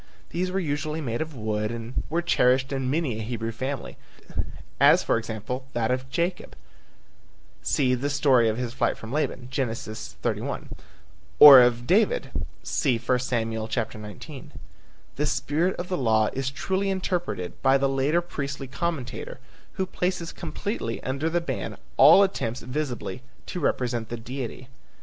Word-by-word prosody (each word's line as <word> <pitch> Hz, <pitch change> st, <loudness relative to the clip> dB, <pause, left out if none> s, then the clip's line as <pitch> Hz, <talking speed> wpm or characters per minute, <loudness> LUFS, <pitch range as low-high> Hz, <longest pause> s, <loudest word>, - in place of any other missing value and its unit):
These 180 Hz, +2 st, -1 dB
were 185 Hz, -, -2 dB
usually 155 Hz, -1 st, -2 dB
made 120 Hz, -5 st, -2 dB
of 160 Hz, -2 st, -5 dB
wood 105 Hz, -2 st, -2 dB
and 115 Hz, +1 st, -4 dB
were 170 Hz, +3 st, 0 dB
cherished 130 Hz, -4 st, +3 dB
in 135 Hz, -1 st, -1 dB
many 140 Hz, -6 st, 0 dB
a -, -, -3 dB
Hebrew 115 Hz, 0 st, -3 dB
family, 130 Hz, +3 st, -5 dB, 0.8 s
as -, -, +6 dB
for -, -, +2 dB
example, 115 Hz, +3 st, -4 dB
that 115 Hz, 0 st, 0 dB
of 130 Hz, +1 st, -2 dB
Jacob 170 Hz, +5 st, -2 dB, 1.1 s
(cf. 125 Hz, -, +1 dB
the 145 Hz, -, 0 dB
story 130 Hz, -5 st, +4 dB
of 110 Hz, -, -2 dB
his 120 Hz, -1 st, -3 dB
flight 120 Hz, -3 st, 0 dB
from 110 Hz, +3 st, -8 dB
Laban, 135 Hz, -4 st, -1 dB
Gen. 130 Hz, -4 st, 0 dB
31) 110 Hz, -1 st, -4 dB, 0.7 s
or 140 Hz, -3 st, +12 dB
of 120 Hz, 0 st, +2 dB
David 225 Hz, -, +2 dB
(I 125 Hz, -3 st, -1 dB
Sam. 120 Hz, -2 st, -1 dB
19). 110 Hz, +4 st, -5 dB, 0.7 s
The 150 Hz, -, +1 dB
spirit 165 Hz, +7 st, 0 dB
of 175 Hz, -, -5 dB
the 180 Hz, -, -1 dB
law 110 Hz, -4 st, +3 dB
is 135 Hz, 0 st, -1 dB
truly 190 Hz, +8 st, -1 dB
interpreted 180 Hz, -, -2 dB
by 135 Hz, 0 st, +5 dB
the 135 Hz, 0 st, +2 dB
later 135 Hz, +5 st, +2 dB
priestly 140 Hz, -5 st, -5 dB
commentator 170 Hz, -, -4 dB, 0.3 s
who 190 Hz, -, -1 dB
places 180 Hz, -2 st, -2 dB
completely 170 Hz, -, -4 dB
under 140 Hz, +5 st, -1 dB
the 175 Hz, +1 st, 0 dB
ban 95 Hz, -, -4 dB, 0.2 s
all 200 Hz, -, +9 dB
attempts 130 Hz, -, -2 dB
visibly 130 Hz, -5 st, -4 dB, 0.2 s
to 180 Hz, -, -5 dB
represent 120 Hz, -7 st, -1 dB
the 120 Hz, -, -4 dB
Deity. 125 Hz, +1 st, -6 dB
130 Hz, 150 wpm, -26 LUFS, 115-160 Hz, 1.1 s, or